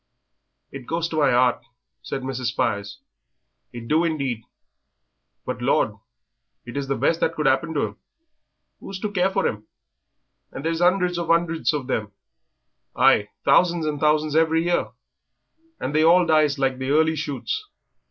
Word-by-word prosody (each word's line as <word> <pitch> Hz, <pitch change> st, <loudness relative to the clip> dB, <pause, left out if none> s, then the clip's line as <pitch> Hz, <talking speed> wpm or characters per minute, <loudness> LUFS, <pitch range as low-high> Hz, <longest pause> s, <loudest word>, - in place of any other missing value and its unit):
"It 135 Hz, -3 st, -9 dB
goes 165 Hz, 0 st, -1 dB
to 160 Hz, -, -4 dB
my 150 Hz, -, +4 dB
'eart," 125 Hz, 0 st, +2 dB, 0.4 s
said 135 Hz, -, -5 dB
Mrs. 130 Hz, -1 st, -4 dB
Spires, 100 Hz, -4 st, -2 dB, 0.7 s
"it 120 Hz, -1 st, -9 dB
do 155 Hz, +5 st, +2 dB
indeed, 140 Hz, -8 st, -2 dB, 1.0 s
but, -, -, -4 dB
Lord, -, -, +2 dB, 0.7 s
it 120 Hz, -, -9 dB
is 140 Hz, -1 st, -3 dB
the 135 Hz, -, 0 dB
best 165 Hz, +4 st, +1 dB
that 165 Hz, -, 0 dB
could 155 Hz, -, -2 dB
'appen 135 Hz, +5 st, +1 dB
to 145 Hz, -, +1 dB
'em; -, -, -17 dB, 0.8 s
who's 195 Hz, -, -7 dB
to 210 Hz, -, -2 dB
care 190 Hz, -1 st, +2 dB
for 190 Hz, -, 0 dB
'em? 105 Hz, 0 st, -5 dB, 0.8 s
and 135 Hz, -, -7 dB
there 165 Hz, -, +1 dB
is 165 Hz, +1 st, -3 dB
'undreds 180 Hz, -1 st, +2 dB
and 170 Hz, -1 st, -4 dB
'undreds 165 Hz, -1 st, +2 dB
of 145 Hz, -4 st, -3 dB
them 110 Hz, -5 st, -3 dB, 0.8 s
ay, 105 Hz, 0 st, +4 dB, 0.2 s
thousands 170 Hz, +3 st, +3 dB
and 150 Hz, -1 st, -2 dB
thousands 150 Hz, 0 st, +1 dB
every 160 Hz, 0 st, +3 dB
year 175 Hz, 0 st, 0 dB, 0.9 s
and 130 Hz, -, -3 dB
they 155 Hz, +1 st, +3 dB
all 175 Hz, +2 st, +5 dB
dies 155 Hz, -3 st, +3 dB
like 135 Hz, -1 st, 0 dB
the 130 Hz, 0 st, -3 dB
early 160 Hz, +2 st, +3 dB
shoots. 155 Hz, -, -4 dB
155 Hz, 160 wpm, -23 LUFS, 130-165 Hz, 1.0 s, all